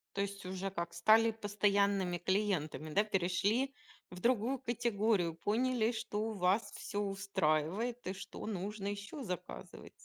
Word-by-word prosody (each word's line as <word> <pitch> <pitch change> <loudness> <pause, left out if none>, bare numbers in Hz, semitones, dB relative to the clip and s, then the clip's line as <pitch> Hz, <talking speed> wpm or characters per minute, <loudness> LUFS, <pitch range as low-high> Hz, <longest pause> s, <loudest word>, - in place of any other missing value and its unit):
То 200 - +1
есть 200 -1 -4
уже 190 +1 -3
как 170 -2 -4
стали 220 +5 +5
постоянными 200 -3 +1
клиентами, 175 -5 0
да, 205 - +5
перешли 210 +7 +1 0.4
в 180 - -9
другую 245 +3 +2
категорию, 220 -8 +1
поняли, 230 +5 +1
что 220 0 -2
вас 195 +3 +1
всё 205 - -4
устраивает 195 +3 0
и 190 - -1
что 195 - -8
нужно 200 0 -3
еще 205 +8 -5
заказывать. 180 -5 -6
200 Hz, 130 wpm, -34 LUFS, 185-220 Hz, 0.4 s, стали